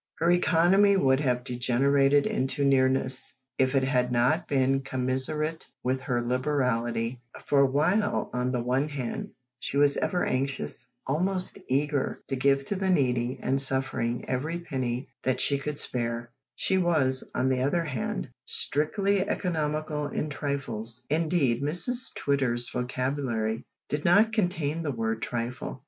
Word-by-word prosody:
Her 170 +2 +2
economy 180 +3 +4
would 135 -5 +3
have 125 -4 0
degenerated 135 +3 +3
into 135 +2 0
nearness 130 -1 +1 0.2
if 130 +1 +2
it 135 - +3
had 125 -2 +1
not 120 +1 +2
been 135 -1 +2
commensurate 135 +5 -1 0.2
with 130 +1 0
her 120 -2 -1
liberality, 125 -2 0 0.2
for 140 -1 +4
while, 175 +10 +1
on 125 0 0
the 125 -2 -1
one 130 +4 0
hand, 135 -5 -4 0.3
she 140 - -2
was 145 0 +4
ever 180 - 0
anxious, 130 - -2 0.2
almost 180 +6 -1
eager, 140 +1 0
to 135 - 0
give 135 +1 +2
to 200 - -2
the 190 0 -1
needy 125 -6 +1
and 135 +1 +1
suffering 130 -3 -1
every 150 +7 -2
penny 130 -5 -3
that 130 -1 0
she 140 -1 +3
could 150 +1 -4
spare, 120 -2 -2 0.2
she 190 - +1
was, 145 -7 +2
on 130 - +1
the 130 -1 +1
other 155 +6 +1
hand, 125 - -3 0.2
strictly 195 +7 0
economical 155 -3 -1
in 150 +1 -3
trifles. 120 -6 -4
Indeed 155 -6 +1
Mrs 205 - 0
Twitter's 125 -4 0
vocabulary 125 -3 -2 0.2
did 145 +1 -2
not 205 +6 +5
contain 165 -7 0
the 160 - -2
word 115 -2 -2
trifle. 120 +2 -4
135 Hz, 140 wpm, -27 LUFS, 125-150 Hz, 0.3 s, not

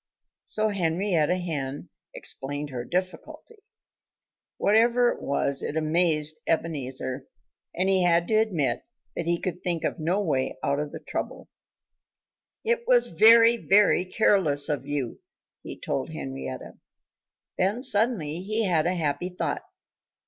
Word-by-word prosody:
So 215 0 +2
Henrietta 180 -3 0
Hen 145 -6 -4 0.3
explained 145 +2 -2
her 125 -2 -4
difficulty. 185 - -5 1.0
Whatever 235 +3 +3
it - - -4
was, 140 0 +1
it 150 - -4
amazed 155 -1 +2
Ebenezer. 135 -4 -3 0.5
And 185 +2 0
he 190 -1 +3
had 170 -1 +2
to - - 0
admit 205 -11 +1 0.3
that 170 - -4
he 170 0 +1
could 180 -1 -4
think 170 -2 -2
of - - -2
no 170 +5 0
way 135 -10 -1
out 140 +1 0
of 150 -1 -4
the - - -7
trouble. - - -6 1.2
"It 470 +1 0
was - - +4
very, 230 +6 +6
very 205 -4 +3
careless 180 -8 +2
of 140 -2 -3
you," 145 -5 -3 0.4
he - - -8
told - - -3
Henrietta. 65 -1 -7 0.8
Then 205 +7 0
suddenly 205 - +1
he 215 +3 -1
had 170 -4 +1
a 180 - 0
happy 165 +2 -2
thought. 180 - -3
170 Hz, 135 wpm, -26 LUFS, 145-205 Hz, 1.2 s, very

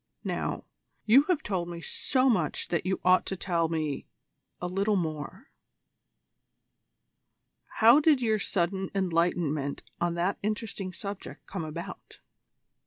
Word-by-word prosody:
Now, - - -2 0.4
you 260 +7 +6
have 330 -4 +2
told 185 -4 -2
me 170 -1 -6
so 255 - +1
much 180 - +1
that 170 +1 -1
you 190 - 0
ought 185 0 +5
to 190 - -2
tell 170 -3 0
me 155 -3 -2 0.5
a - - -4
little 200 +4 +1
more. 155 -5 -4 2.3
How 230 +6 +8
did 305 -2 +4
your 220 -3 +1
sudden 190 -1 -1
enlightenment 165 -6 0 0.2
on 170 0 0
that 180 +3 0
interesting 210 -2 -3
subject 200 +2 -7
come 190 -4 -5
about?" 160 +2 -8
185 Hz, 125 wpm, -28 LUFS, 170-210 Hz, 2.3 s, How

